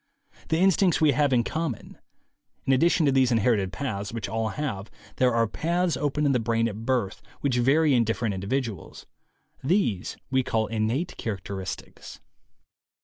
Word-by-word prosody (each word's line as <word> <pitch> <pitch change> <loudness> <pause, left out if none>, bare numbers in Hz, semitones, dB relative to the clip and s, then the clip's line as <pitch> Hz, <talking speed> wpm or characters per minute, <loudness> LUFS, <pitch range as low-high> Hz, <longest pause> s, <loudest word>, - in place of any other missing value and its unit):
The 160 - +2
instincts 190 0 +3
we 155 -2 +5
have 145 +1 +2
in 120 -2 +3
com 160 +1 -2
mon. - - -15 0.7
In 135 - +3
addition 165 +4 +3
to 140 - +4
these 130 -2 +3
inherited 110 -4 +2
paths 100 -2 -4
which 115 -3 -4
all 110 0 -1
have, 110 -9 -4 0.3
there 125 -1 +3
are 115 -1 +2
paths 170 - 0
open 150 +1 -1
in 140 - +3
the 125 - +2
brain 115 0 +1
at 110 +1 -6
birth 120 -7 0 0.2
which 130 -4 +1
vary 145 +4 +4
in 120 -2 +4
different 115 -1 -1
individuals. 105 +1 -4 0.6
These 135 - 0
we 130 0 +3
call 115 -4 0
innate 115 +9 -2
characteristics. 95 -2 -6
125 Hz, 160 wpm, -26 LUFS, 110-145 Hz, 0.7 s, we